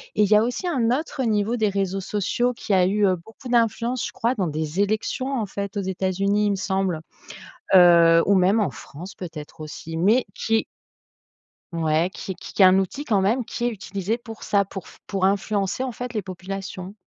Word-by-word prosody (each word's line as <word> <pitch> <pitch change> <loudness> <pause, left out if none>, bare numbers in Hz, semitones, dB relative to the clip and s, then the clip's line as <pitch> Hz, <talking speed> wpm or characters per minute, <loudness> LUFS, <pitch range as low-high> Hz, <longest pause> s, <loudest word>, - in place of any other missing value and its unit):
et 210 - +4
il 200 - +1
y 210 - +6
a 210 - +5
aussi 245 +9 -2
un 255 -9 +1
autre 275 0 -2
niveau 220 0 +1
des 220 -3 +1
réseaux 195 -1 -1
sociaux 210 +5 0
qui 215 - -3
a 185 -1 +5
eu, 205 +2 +2
heu, 185 - +2
beaucoup 220 +9 -13
d'influence, 235 +1 +1
je - - -5
crois, 250 0 -1
dans 190 -6 -1
des 155 +3 -2
élections, 215 +6 -1
en 215 - -1
fait, 200 +1 -5
aux - - 0
États-Unis, 195 +2 0
il - - +2
me - - 0
semble, 190 -3 -1 0.8
heu 170 -2 +7
ou 200 - +4
même 190 +4 +4
en 205 - +1
France, 175 +7 -10
peut-être, 160 -3 -9
aussi 155 +1 -7
mais 210 +9 +3
qui 225 0 0 1.1
ouais, 160 +1 +1
qui 190 - -6
qui 200 - -11
qui - - +1
est - - +10
un 185 +1 +6
outil, 195 +9 -3
quand 215 -8 +1
même, 225 +7 +1
qui 240 +1 -5
est - - +2
utilisé 200 0 -3
pour 225 -2 -10
ça, 200 -1 +2
pour 195 -2 -9
f - - -16
pour 195 -2 0
influencer, 200 +2 0
en 260 - -3
fait, 245 +2 -6
les 215 - -1
populations. 190 0 -7
200 Hz, 210 wpm, -23 LUFS, 185-225 Hz, 1.1 s, est